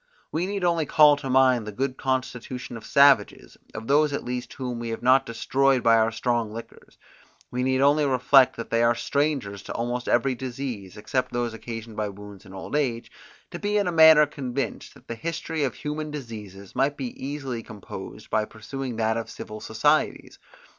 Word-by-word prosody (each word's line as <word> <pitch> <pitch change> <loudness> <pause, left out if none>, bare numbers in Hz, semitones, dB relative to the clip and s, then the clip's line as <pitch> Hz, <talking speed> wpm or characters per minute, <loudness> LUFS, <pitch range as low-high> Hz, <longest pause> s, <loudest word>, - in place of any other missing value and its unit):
We 170 +4 -1
need 200 -1 -3
only 170 -4 +1
call 150 -2 +6
to 135 -2 -6
mind 130 -4 +4
the - - -4
good 130 +4 -2
constitution 125 -2 -3
of 115 - -9
savages, 140 -6 +4 0.2
of 110 - -6
those 145 +3 +3
at - - -2
least 125 0 -5
whom 125 -3 -4
we 120 -1 -4
have 115 +1 -5
not 130 +2 +4
destroyed 130 +3 +1
by 115 -1 +6
our 110 0 +3
strong 115 -1 -1
liquors; 115 +2 -11 0.5
we 125 - -2
need 130 +1 +1
only 145 +2 +4
reflect, 130 0 +5
that 115 - -7
they 115 - +2
are 120 0 +4
strangers 130 -5 -1
to - - -7
almost 120 +1 -3
every 130 +2 +2
disease, 120 -6 -6
except 130 +4 -2
those 120 -1 -1
occasioned 115 -1 -8
by 105 -1 -1
wounds 100 0 -11
and 95 0 -12
old 95 - -6
age, 125 -6 -1 0.4
to - - -6
be 205 0 0
in 205 - +2
a 180 - 0
manner 160 -2 +8
convinced 135 -2 -5
that - - -19
the - - -4
history 160 +3 -3
of 130 -6 -1
human 150 +4 -4
diseases 105 -9 -9
might 140 +2 +1
be 130 -4 -4
easily 135 -4 -4
composed 105 -4 -10
by 110 - +2
pursuing 115 +4 -6
that 110 0 0
of 115 - -4
civil 110 0 -8
societies. 145 +7 0
125 Hz, 190 wpm, -25 LUFS, 115-140 Hz, 0.5 s, manner